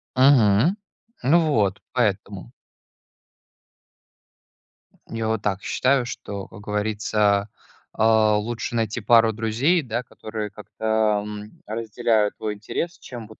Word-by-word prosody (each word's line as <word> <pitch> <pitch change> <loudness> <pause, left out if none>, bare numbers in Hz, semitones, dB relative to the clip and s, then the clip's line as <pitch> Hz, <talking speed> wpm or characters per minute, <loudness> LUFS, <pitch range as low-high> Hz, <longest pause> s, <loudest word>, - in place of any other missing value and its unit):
Мгм. 130 - +5 0.5
Ну 150 +7 +5
вот, 100 -7 +1
поэтому. - - -1 2.6
Я 115 -1 -3
вот 110 -1 -1
так 100 -2 -1
считаю, 130 -1 +1
что, 100 -5 -6
как 105 - -13
говорится, 105 0 0 0.5
э, - - +1
лучше 110 +1 +2
найти 115 +1 -1
пару 115 0 +5
друзей 120 - +1
да, 120 -1 -3
которые 110 -3 -6
как-то, 105 0 -1
м, 105 0 -9
разделяют 110 -1 0
твой 105 -1 -3
интерес, 165 - -4
чем 120 -4 -9
вот 110 - -16
110 Hz, 110 wpm, -23 LUFS, 105-120 Hz, 2.6 s, Мгм